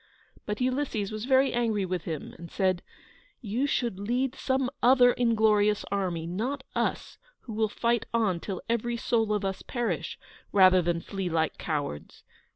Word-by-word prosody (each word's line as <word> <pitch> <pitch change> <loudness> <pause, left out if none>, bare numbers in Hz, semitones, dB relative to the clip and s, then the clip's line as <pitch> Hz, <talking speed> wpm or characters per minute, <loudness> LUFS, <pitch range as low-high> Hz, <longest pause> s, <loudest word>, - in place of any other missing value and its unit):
But 210 0 -2
Ulysses 250 -5 -1
was 215 +1 -4
very 265 +1 +4
angry 225 -5 +1
with 180 -2 -3
him, 160 -3 -5
and 170 0 -9
said: 185 -3 0 0.6
"You 240 +5 -1
should 235 -8 -1
lead 245 +5 0
some 265 -1 0
other 245 0 +6
inglorious 215 -3 +3
army, 180 -5 -1
not 240 +11 -3
us, - - -2 0.2
who 230 - -8
will 220 0 +1
fight 235 +1 0
on 215 -7 +1
till 190 +1 -5
every 235 +1 -1
soul 225 -2 +1
of 210 -1 0
us 195 0 -3
perish, 240 -2 -3 0.3
rather 185 -2 +6
than 170 -1 -1
flee 195 -1 -4
like 160 -1 0
cowards! 145 - -4
215 Hz, 160 wpm, -28 LUFS, 185-240 Hz, 0.6 s, other